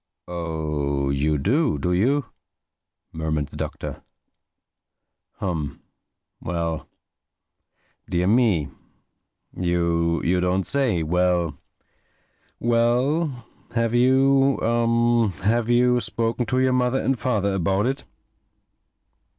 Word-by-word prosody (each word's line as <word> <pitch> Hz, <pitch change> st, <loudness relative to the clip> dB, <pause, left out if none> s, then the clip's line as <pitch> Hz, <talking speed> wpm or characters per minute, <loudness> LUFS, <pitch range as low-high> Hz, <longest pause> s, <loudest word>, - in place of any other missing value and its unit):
"Oh 75 Hz, -5 st, -2 dB
you 75 Hz, +2 st, +1 dB
do, 130 Hz, -, +1 dB
do 90 Hz, +6 st, -1 dB
you?" 130 Hz, +10 st, +2 dB, 0.9 s
murmured 80 Hz, -2 st, -2 dB
the -, -, -13 dB
Doctor. -, -, -5 dB, 1.3 s
"Humph!—Well!—Dear 85 Hz, +1 st, -7 dB
me!—You 85 Hz, -, -1 dB
don't 90 Hz, +1 st, 0 dB
say!—Well, 90 Hz, -, +1 dB, 1.0 s
well! 120 Hz, +4 st, +1 dB, 0.3 s
Have 115 Hz, -1 st, +1 dB
you 135 Hz, +2 st, +4 dB
er—have 115 Hz, -2 st, +1 dB
you 125 Hz, +1 st, +4 dB
spoken 115 Hz, +1 st, -1 dB
to 130 Hz, +2 st, +1 dB
your 130 Hz, 0 st, +2 dB
mother 125 Hz, +1 st, +1 dB
and 135 Hz, -3 st, 0 dB
father 100 Hz, -6 st, 0 dB
about 95 Hz, +3 st, +1 dB
it?" 135 Hz, +2 st, -2 dB
105 Hz, 75 wpm, -23 LUFS, 85-125 Hz, 1.3 s, you